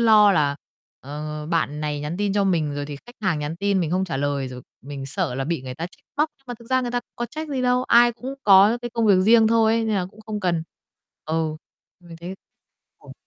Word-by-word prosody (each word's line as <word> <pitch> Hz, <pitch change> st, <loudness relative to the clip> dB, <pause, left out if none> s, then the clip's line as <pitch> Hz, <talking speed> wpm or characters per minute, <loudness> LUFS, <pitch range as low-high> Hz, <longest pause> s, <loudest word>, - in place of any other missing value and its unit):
lo 215 Hz, -3 st, +6 dB
là, 145 Hz, -4 st, +1 dB, 0.4 s
ờ, 150 Hz, +2 st, -6 dB
bạn 155 Hz, -3 st, -1 dB
này 150 Hz, -1 st, -2 dB
nhắn 150 Hz, +4 st, -4 dB
tin 205 Hz, 0 st, 0 dB
cho 200 Hz, -1 st, +2 dB
mình 160 Hz, -6 st, +1 dB
rồi 145 Hz, 0 st, -4 dB
thì 145 Hz, -1 st, -6 dB
khách 240 Hz, -, -13 dB
hàng 180 Hz, -6 st, +1 dB
nhắn 150 Hz, +3 st, -4 dB
tin 200 Hz, 0 st, +1 dB
mình 165 Hz, -3 st, -1 dB
không 185 Hz, +2 st, +1 dB
trả 170 Hz, -6 st, -3 dB
lời, 140 Hz, -1 st, -1 dB
rồi 125 Hz, -1 st, -9 dB, 0.2 s
mình 140 Hz, 0 st, -7 dB
sợ 125 Hz, -2 st, -1 dB
là 135 Hz, -, -2 dB
bị 165 Hz, -2 st, -2 dB
người 130 Hz, -1 st, -6 dB
ta 165 Hz, +4 st, -4 dB
trách 180 Hz, -, -21 dB
móc, 300 Hz, +2 st, +2 dB
nhưng 270 Hz, -, -34 dB
mà 245 Hz, -, -4 dB
thực 235 Hz, -, -15 dB
ra 260 Hz, -, +3 dB
người 245 Hz, -1 st, -3 dB
ta 245 Hz, 0 st, -1 dB, 0.2 s
có 240 Hz, -, -2 dB
trách 310 Hz, +4 st, -6 dB
gì 270 Hz, -3 st, -2 dB
đâu, 250 Hz, 0 st, +2 dB
ai 240 Hz, 0 st, +5 dB
cũng 250 Hz, +4 st, -7 dB
có 200 Hz, +4 st, +6 dB
cái 240 Hz, -, -4 dB
công 230 Hz, -1 st, 0 dB
việc 200 Hz, -, +6 dB
riêng 225 Hz, +3 st, +5 dB
thôi 225 Hz, 0 st, +4 dB
nên 225 Hz, -1 st, 0 dB
là 180 Hz, -2 st, -1 dB
cũng 215 Hz, -, -17 dB
không 215 Hz, -1 st, -4 dB
cần. 175 Hz, -4 st, 0 dB, 0.6 s
Ừ, 160 Hz, -1 st, -1 dB, 0.4 s
mình 170 Hz, -2 st, -12 dB
thấy 175 Hz, +3 st, -7 dB, 0.6 s
ồ. -, -, -13 dB
185 Hz, 250 wpm, -23 LUFS, 150-225 Hz, 0.6 s, lo